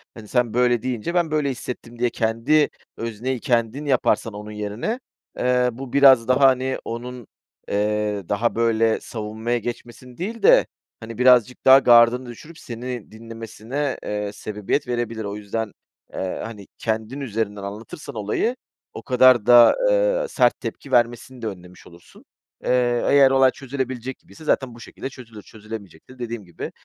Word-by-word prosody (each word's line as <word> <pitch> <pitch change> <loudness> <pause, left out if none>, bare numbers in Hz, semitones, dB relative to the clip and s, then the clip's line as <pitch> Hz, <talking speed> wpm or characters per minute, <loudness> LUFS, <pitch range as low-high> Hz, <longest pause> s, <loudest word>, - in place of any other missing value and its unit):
hani, 110 -2 -11
sen 125 -1 0
böyle 120 -1 +2
deyince 125 +5 -3
ben 170 -3 +1
böyle 150 -2 +1
hissettim." 120 -2 -7
diye 120 0 +2
kendi 115 +8 +1 0.3
özneyi 115 +3 -3
kendin 120 +3 0
yaparsan 125 -4 +1
onun 105 +1 -8
yerine, 105 - -4 0.4
eee, 125 0 +2
bu 125 +2 -9
biraz 135 -5 +6
daha, 130 +2 +3
hani, 130 0 +1
onun, 120 0 -7 0.4
eee, 105 0 -1
daha 115 +3 0
böyle 115 -1 +2
savunmaya 110 +2 -3
geçmesini 120 +1 -8
değil 220 +7 -5
de, - - +6 0.3
hani, 115 0 -9
birazcık 125 -1 +4
daha 135 +1 +9
gardını 120 0 +5
düşürüp 155 +8 -12
seni 120 -1 -7
dinlemesine, 115 +5 -5
eee, 105 -1 -3
sebebiyet 105 +8 -3
verebilir. 120 -2 -3
O 100 0 -5
yüzden, 105 +1 -4 0.4
eee, 95 - -4
hani, 105 -4 -9
kendin 110 +4 -3
üzerinden 105 -5 -3
anlatırsan 115 - -8
olayı 110 - -1 0.4
o - - -7
kadar 125 -3 +5
da, 120 0 +8
eee, - - +2
sert - - +2
tepki 140 - -7
vermesini 120 +1 0
de 115 - -3
önlemiş 90 -2 -10
olursun. 85 0 -18 0.4
Eee, - - -3 0.4
eğer 140 -1 +6
olay 135 -1 +5
çözülebilecek 130 -2 -5
gibiyse 160 - -16
zaten 130 -5 0
bu - - -13
şekilde 130 - -8
çözülür. 115 -5 -12
Çözülemeyecekse 110 +1 -11
dediğim 115 -3 -5
gibi, 85 -2 -7
120 Hz, 150 wpm, -22 LUFS, 110-130 Hz, 0.4 s, daha